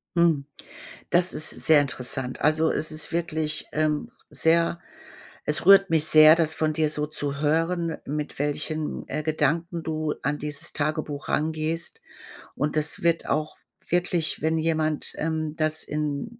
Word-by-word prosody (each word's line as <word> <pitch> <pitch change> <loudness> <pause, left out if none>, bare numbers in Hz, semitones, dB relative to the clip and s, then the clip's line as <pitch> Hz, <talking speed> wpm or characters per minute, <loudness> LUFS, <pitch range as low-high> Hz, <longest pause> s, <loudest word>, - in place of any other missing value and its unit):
Hm, 165 -5 +3 0.6
das 180 +1 +2
ist 155 - -1
sehr 155 -2 +4
interessant. 130 -1 -3
Also, 155 +2 +3
es 155 - -2
ist 155 0 -4
wirklich, 160 -2 -2
ähm, 155 -1 0 0.2
sehr 165 +1 +1 0.7
es 150 +3 0
rührt 195 0 +7
mich 160 -2 +3
sehr, 155 0 +8
das 160 -2 +1
von 155 -1 +1
dir 155 0 +1
so 150 0 -2
zu 145 -2 -4
hören, 165 +2 0
mit 150 +1 -4
welchen, 150 +2 -3
äh, 150 +2 -3
Gedanken 165 +2 0
du 155 -1 -2
an 145 +1 -1
dieses 150 -1 -4
Tagebuch 150 -1 -3
rangehst. 160 +2 -2 0.6
Und 150 +2 -1
es 155 +2 +1
wird 170 -1 +1
auch 155 0 -1 0.3
wirklich, 175 -2 0
wenn 160 +1 +1
jemand, 155 -1 -1
ähm, 155 -1 -2
das 155 -1 0
in 150 +10 -4
155 Hz, 145 wpm, -25 LUFS, 150-165 Hz, 0.7 s, sehr